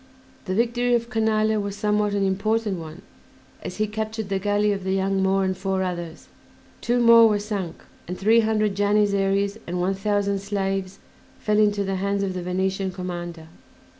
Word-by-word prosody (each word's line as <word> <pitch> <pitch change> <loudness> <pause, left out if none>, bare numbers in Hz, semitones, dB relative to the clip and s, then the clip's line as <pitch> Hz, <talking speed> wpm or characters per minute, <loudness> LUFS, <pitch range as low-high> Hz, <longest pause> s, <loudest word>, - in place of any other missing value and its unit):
The 185 - -2
victory 240 +2 +2
of 235 0 -2
Canale 220 -1 +1
was 200 -1 -4
somewhat 210 0 0
an 200 -1 +1
important 205 0 0
one 160 +2 -9 0.6
as - - -7
he 215 - +1
captured 215 0 -4
the 195 -1 0
galley 205 +1 +1
of 195 -2 -3
"The 190 0 -1
Young 195 0 0
Moor" 190 0 +2
and 190 0 0
four 190 0 -1
others; 175 -2 -5 0.5
two 240 +1 +1
more 230 -1 +7
were 210 - +2
sunk, 205 -4 -5 0.2
and 180 +1 -5
three 220 +4 +4
hundred 215 -2 +1
Janissaries 200 0 +1
and 180 +1 -3
one 185 +2 +1
thousand 200 0 0
slaves 195 -1 -3 0.4
fell 210 0 +1
into 205 -1 +3
the 195 -1 -2
hands 200 +1 -1
of 190 -1 -2
the 180 - -4
Venetian 190 +2 -1
commander. 175 -3 -6
200 Hz, 175 wpm, -24 LUFS, 190-215 Hz, 0.6 s, more